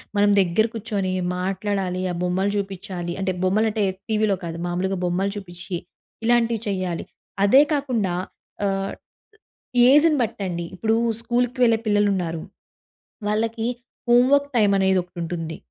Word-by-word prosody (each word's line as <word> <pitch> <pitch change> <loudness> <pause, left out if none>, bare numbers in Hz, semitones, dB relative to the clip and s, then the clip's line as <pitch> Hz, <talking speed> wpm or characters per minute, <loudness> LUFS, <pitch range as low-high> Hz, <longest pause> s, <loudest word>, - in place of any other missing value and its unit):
మనం 205 0 +4
దగ్గర 190 +3 +3
కూర్చొని 205 -4 -2 0.3
మాట్లాడాలి, 190 -1 -2
ఆ - - -3
బొమ్మలు 190 +3 +1
చూపించాలి. 190 -3 -4
అంటే 190 -1 0
బొమ్మలంటే 215 +2 +2 0.3
టీవీలో 215 -2 +2
కాదు, 165 0 -5
మామూలుగా 180 +2 -1
బొమ్మలు 185 +3 0
చూపించి 175 -2 -6 0.5
ఇలాంటివి 235 -1 +3
చేయాలి. 185 -3 -2 0.4
అదే 265 +8 +7
కాకుండా 245 -10 0 0.5
ఆహ్, 195 0 -1 1.0
ఏజ్‌ని 300 +2 +6
బట్టండి 190 -6 -3
ఇప్పుడు 220 +4 +1 0.2
స్కూల్‌కి 245 +2 0
వెళ్ళే 230 -2 +4
పిల్లలు 205 -1 +3
ఉన్నారు. 165 -3 -3 0.9
వాళ్ళకి 225 +2 0 0.4
హోం 245 +1 +6
వర్క్ 285 0 +3
టైం 205 -2 +4
అనేది 190 -1 +3
ఒకటి 175 0 -21
ఉంటుంది. 165 -1 -4
200 Hz, 125 wpm, -23 LUFS, 180-225 Hz, 1.0 s, అదే